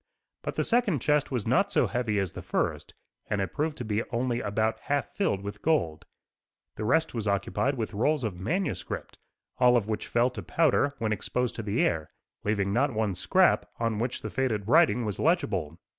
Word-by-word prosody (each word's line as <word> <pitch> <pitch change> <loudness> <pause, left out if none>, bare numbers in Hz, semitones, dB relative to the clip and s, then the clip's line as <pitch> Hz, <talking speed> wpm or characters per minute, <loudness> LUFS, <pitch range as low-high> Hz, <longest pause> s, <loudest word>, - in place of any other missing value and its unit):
But - - -4
the - - +1
second 235 -8 +2
chest 150 +3 +2
was 125 -6 -2
not - - +2
so - - +3
heavy 120 -4 -1
as 95 -3 0
the - - -8
first, - - -2 0.3
and 105 -1 0
it 95 -2 -2
proved 155 0 -1
to 125 - -5
be 110 0 0
only 120 0 -1
about 110 +1 0
half 145 0 -2
filled 100 - 0
with 100 +1 -6
gold. 85 - 0 0.7
The 110 - -4
rest 160 +7 +2
was 110 -3 -3
occupied 100 +7 0
with 110 -2 -3
rolls 140 +7 +1
of 110 -4 -1
manuscript, 170 - -3 0.4
all 125 -1 +6
of 105 -3 -1
which 110 -1 -3
fell 120 +2 +2
to - - -6
powder 145 -3 +2
when 110 -3 -1
exposed 125 +3 -2
to - - -2
the 105 +1 0
air, 80 -2 -1 0.3
leaving 100 -2 0
not 130 +1 +1
one 110 -2 0
scrap 185 - +3
on 115 -2 0
which 120 +2 -2
the - - -4
faded 110 -6 -1
writing 140 -4 +4
was 105 -2 -3
legible. 100 - 0
115 Hz, 195 wpm, -28 LUFS, 105-145 Hz, 0.7 s, all